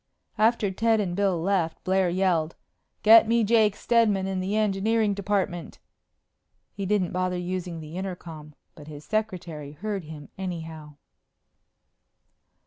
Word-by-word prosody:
After 220 Hz, -2 st, +3 dB
Ted 225 Hz, +3 st, +2 dB
and 180 Hz, -4 st, -2 dB
Bill 195 Hz, -3 st, +1 dB
left, 170 Hz, -2 st, -1 dB
Blair 190 Hz, -1 st, +2 dB
yelled, 175 Hz, -3 st, 0 dB, 0.5 s
"Get 225 Hz, +1 st, +8 dB
me 230 Hz, 0 st, +3 dB
Jake 215 Hz, -1 st, +3 dB
Steadman 220 Hz, -5 st, +2 dB
in 190 Hz, -1 st, -2 dB
the 190 Hz, +3 st, -2 dB
engineering 215 Hz, +1 st, +1 dB
department!" 195 Hz, -4 st, -2 dB, 1.0 s
He 200 Hz, -1 st, -4 dB
didn't 195 Hz, -3 st, +1 dB
bother 185 Hz, 0 st, -1 dB
using 180 Hz, -1 st, -4 dB
the 155 Hz, +1 st, -9 dB
intercom, 165 Hz, -5 st, -7 dB, 0.2 s
but 150 Hz, -1 st, -13 dB
his 150 Hz, -1 st, -10 dB
secretary 175 Hz, -8 st, -3 dB
heard 200 Hz, +2 st, -4 dB
him 150 Hz, -2 st, -10 dB
anyhow. 160 Hz, -5 st, -6 dB
185 Hz, 130 wpm, -26 LUFS, 165-210 Hz, 1.0 s, Get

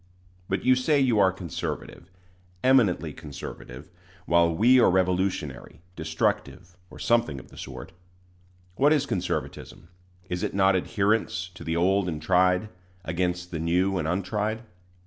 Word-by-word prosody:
But 95 Hz, -, -2 dB
you 130 Hz, -, +6 dB
say 140 Hz, +4 st, +2 dB
you 125 Hz, -6 st, +3 dB
are 95 Hz, -2 st, +5 dB
conservative 90 Hz, -1 st, -6 dB, 0.5 s
eminently 105 Hz, -, +3 dB
conservative 75 Hz, 0 st, -9 dB, 0.3 s
while 85 Hz, 0 st, +3 dB
we 120 Hz, +9 st, +5 dB
are -, -, +5 dB
revolutionary, 90 Hz, -7 st, -1 dB, 0.2 s
destructive, 80 Hz, +2 st, -2 dB
or -, -, -13 dB
something 115 Hz, -, +1 dB
of -, -, -15 dB
the -, -, -16 dB
sort. -, -, -8 dB, 0.9 s
What 145 Hz, +3 st, +5 dB
is 145 Hz, -2 st, +1 dB
conservatism? 90 Hz, -, -4 dB, 0.4 s
Is 90 Hz, -1 st, -3 dB
it -, -, -3 dB
not 95 Hz, -1 st, +4 dB
adherence 100 Hz, -1 st, 0 dB
to 90 Hz, -, -11 dB
the 80 Hz, 0 st, -2 dB
old 95 Hz, +2 st, +2 dB
and 80 Hz, -3 st, -4 dB
tried, 90 Hz, +4 st, +2 dB, 0.4 s
against 90 Hz, +1 st, -2 dB
the 80 Hz, -, -4 dB
new 90 Hz, +4 st, +1 dB
and 80 Hz, -, -2 dB
untried? 105 Hz, +5 st, -2 dB
90 Hz, 140 wpm, -26 LUFS, 85-105 Hz, 0.9 s, you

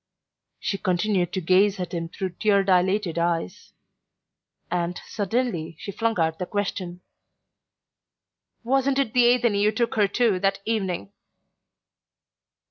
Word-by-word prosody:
She 195 Hz, -, -2 dB
continued 185 Hz, -1 st, 0 dB
to 190 Hz, -, -1 dB
gaze 190 Hz, +4 st, +3 dB
at 180 Hz, -2 st, -4 dB
him 165 Hz, -1 st, -3 dB
through 190 Hz, +2 st, -4 dB
tear 200 Hz, -2 st, +3 dB
dilated 185 Hz, -1 st, +1 dB
eyes; 170 Hz, -, -2 dB, 1.0 s
and 175 Hz, 0 st, -1 dB
suddenly 205 Hz, -6 st, -2 dB
she 200 Hz, -, -6 dB
flung 225 Hz, -1 st, -1 dB
out 160 Hz, -1 st, 0 dB
the 180 Hz, -, -3 dB
question: 185 Hz, -3 st, -3 dB, 1.6 s
"Wasn't 270 Hz, +2 st, +1 dB
it 270 Hz, -5 st, 0 dB
the 250 Hz, -2 st, +5 dB
Athenee 240 Hz, -4 st, +3 dB
you 210 Hz, +1 st, +4 dB
took 230 Hz, +2 st, -1 dB
her 210 Hz, -2 st, +3 dB
to 210 Hz, -2 st, +1 dB
that 195 Hz, +1 st, +1 dB
evening?" 190 Hz, -, -2 dB
195 Hz, 125 wpm, -24 LUFS, 180-220 Hz, 1.6 s, the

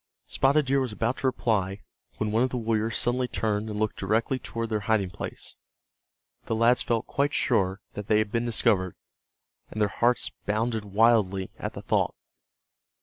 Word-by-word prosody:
Spotted 140 Hz, +2 st, +2 dB
Deer 135 Hz, +1 st, +2 dB
was 130 Hz, -3 st, -2 dB
about 115 Hz, +5 st, -1 dB
to 135 Hz, -, 0 dB
reply 105 Hz, -6 st, 0 dB, 0.4 s
when 110 Hz, -1 st, -1 dB
one 110 Hz, +2 st, +2 dB
of 130 Hz, -, +2 dB
the 125 Hz, -, -3 dB
warriors 110 Hz, -1 st, 0 dB
suddenly 125 Hz, +1 st, +1 dB
turned 110 Hz, -2 st, -1 dB
and 105 Hz, -, -4 dB
looked 110 Hz, 0 st, -1 dB
directly 110 Hz, +6 st, 0 dB
toward 115 Hz, -2 st, -4 dB
their 110 Hz, -1 st, 0 dB
hiding 100 Hz, -5 st, +2 dB
place. -, -, -6 dB, 0.9 s
The 115 Hz, -, -1 dB
lads 115 Hz, +2 st, +4 dB
felt 115 Hz, -2 st, 0 dB
quite 140 Hz, +1 st, 0 dB
sure 95 Hz, -6 st, +1 dB
that 105 Hz, -1 st, -6 dB
they 105 Hz, -, +4 dB
had 110 Hz, -1 st, 0 dB
been 115 Hz, +1 st, 0 dB
discovered, 105 Hz, -6 st, +2 dB, 0.7 s
and 110 Hz, -, -6 dB
their 105 Hz, -1 st, +3 dB
hearts 120 Hz, +5 st, +1 dB, 0.2 s
bounded 110 Hz, +1 st, 0 dB
wildly 100 Hz, -2 st, +2 dB
at -, -, -4 dB
the -, -, -8 dB
thought. -, -, +1 dB
110 Hz, 175 wpm, -27 LUFS, 105-120 Hz, 0.9 s, lads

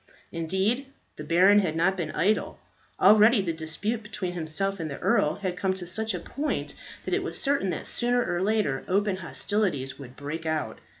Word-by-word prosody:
Indeed, 190 Hz, -, -1 dB, 0.3 s
the 150 Hz, -, -7 dB
baron 185 Hz, +6 st, +5 dB
had 175 Hz, -6 st, 0 dB
not 175 Hz, +4 st, +2 dB
been 170 Hz, -4 st, -3 dB
idle. 210 Hz, +7 st, 0 dB, 0.4 s
Already 215 Hz, +3 st, +7 dB
the 180 Hz, -4 st, -1 dB
dispute 165 Hz, +8 st, -3 dB
between 195 Hz, -4 st, -5 dB
himself 180 Hz, +4 st, -2 dB
and 160 Hz, -1 st, -3 dB
the 140 Hz, -, -5 dB
earl 150 Hz, -, +2 dB
had 185 Hz, -3 st, -3 dB
come 190 Hz, +1 st, 0 dB
to 185 Hz, -2 st, -6 dB
such 220 Hz, +5 st, -2 dB
a -, -, -3 dB
point 295 Hz, +2 st, -3 dB, 0.3 s
that -, -, -2 dB
it -, -, +2 dB
was -, -, -2 dB
certain 275 Hz, -9 st, +1 dB
that 170 Hz, -, -3 dB
sooner 245 Hz, 0 st, +1 dB
or 175 Hz, 0 st, -1 dB
later 195 Hz, -10 st, +1 dB
open 200 Hz, +1 st, +1 dB
hostilities 185 Hz, -8 st, -2 dB
would 130 Hz, -2 st, -10 dB
break 150 Hz, +3 st, -5 dB
out. 155 Hz, -1 st, -2 dB
190 Hz, 185 wpm, -27 LUFS, 160-210 Hz, 0.4 s, Already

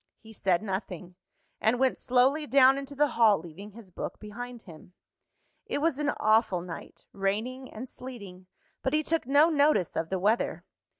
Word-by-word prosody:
He 220 Hz, 0 st, -15 dB
said 190 Hz, -2 st, 0 dB
nothing; 190 Hz, -3 st, -5 dB, 0.5 s
and 225 Hz, +3 st, +2 dB
went 260 Hz, 0 st, +2 dB
slowly 265 Hz, +5 st, +2 dB
down 270 Hz, +1 st, +5 dB
into 280 Hz, +1 st, -8 dB
the 295 Hz, +1 st, +2 dB
hall, 220 Hz, -4 st, +4 dB
leaving 190 Hz, +5 st, -11 dB
his 215 Hz, -4 st, -13 dB
book 175 Hz, -, -6 dB
behind 235 Hz, +3 st, -8 dB
him. 170 Hz, 0 st, -14 dB, 0.7 s
It -, -, -2 dB
was 290 Hz, -1 st, 0 dB
an 295 Hz, -1 st, 0 dB
awful 215 Hz, -4 st, +3 dB
night, 170 Hz, -2 st, -9 dB
raining 220 Hz, +7 st, -3 dB
and 240 Hz, +5 st, -7 dB
sleeting 200 Hz, -9 st, -10 dB, 0.3 s
but 265 Hz, -, -1 dB
he 310 Hz, 0 st, +2 dB
took 325 Hz, -4 st, -1 dB
no 290 Hz, +4 st, +5 dB
notice 285 Hz, -, +2 dB
of 165 Hz, -, -2 dB
the 190 Hz, -, -1 dB
weather. 210 Hz, +5 st, 0 dB
230 Hz, 170 wpm, -28 LUFS, 195-265 Hz, 0.7 s, down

